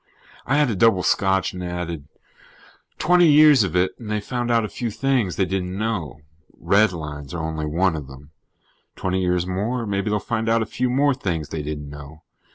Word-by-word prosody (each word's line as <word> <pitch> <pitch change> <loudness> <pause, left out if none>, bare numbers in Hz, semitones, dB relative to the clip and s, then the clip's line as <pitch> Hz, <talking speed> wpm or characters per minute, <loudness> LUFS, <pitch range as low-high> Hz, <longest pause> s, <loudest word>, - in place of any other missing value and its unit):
I 135 - +2
had 145 -5 +3
a - - -2
double 95 -2 +3
scotch 95 -1 +1
and 90 0 -6
added: 85 -4 -5 0.9
"Twenty 175 0 +4
years 150 -4 +7
of 90 -3 -3
it 90 +1 +2
and 115 -3 -8
they 105 0 0
found 120 +3 -3
out 115 -2 +2
a - - -3
few 120 +2 -4
things 125 -5 0
they 95 - +1
didn't 95 0 -3
know. 90 - -3 0.4
Redlines 80 -8 0
are 80 - -3
only 80 -1 -3
one 85 +3 +1
of 75 -4 -6
them. 70 +2 -14 0.6
Twenty 95 0 -1
years 90 -1 +1
more, 110 +7 -2
maybe 100 0 -1
they'll 105 - +1
find 115 0 -2
out 115 0 +3
a - - -5
few 125 +3 -2
more 140 +3 +3
things 85 - -3
they 80 - -4
didn't 75 -1 -5
know. 75 +2 -11
95 Hz, 195 wpm, -22 LUFS, 80-115 Hz, 0.9 s, years